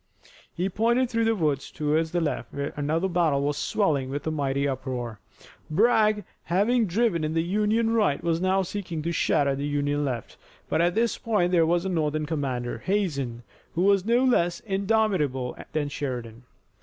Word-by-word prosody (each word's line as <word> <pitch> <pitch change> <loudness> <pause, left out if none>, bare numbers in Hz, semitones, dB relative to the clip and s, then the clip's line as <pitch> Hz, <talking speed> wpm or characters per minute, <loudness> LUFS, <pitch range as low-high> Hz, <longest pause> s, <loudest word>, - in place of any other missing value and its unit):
He 180 +2 -2
pointed 235 +5 +1
through 230 -1 +1
the 225 0 +2
woods 150 -7 -1
toward 155 +2 0
the 175 +2 -1
left 160 - -2
where 140 0 -4
another 155 +5 0
battle 165 -6 +1
was 145 0 0
swelling 145 -8 0
with 145 +1 -4
a 160 - 0
mighty 140 -2 0
uproar. 125 -5 -4 0.5
Bragg 215 +3 +3 0.2
having 210 +6 +2
driven 190 -3 +1
in 155 +1 -2
the 165 - +2
Union 215 +5 +1
right 210 -11 +1
was 165 0 0
now 190 +1 +2
seeking 175 -4 -5
to 170 - -1
shatter 145 -4 +2
the 140 +1 -3
Union 145 0 0
left, 125 -5 -4 0.3
but 160 - +1
at 175 +1 +2
this 230 +1 +1
point 210 -7 +1
there 165 -3 +4
was 175 +2 +1
a - - -1
Northern 155 -3 0
commander, 135 -6 -3
Hazen, 140 - -1 0.3
who 175 - +1
was 200 -1 +4
no 235 +4 +3
less 175 -9 +2
indomitable 195 - 0 0.2
than 150 -2 -1
Sheridan. 125 -5 -5
165 Hz, 175 wpm, -26 LUFS, 145-200 Hz, 0.5 s, there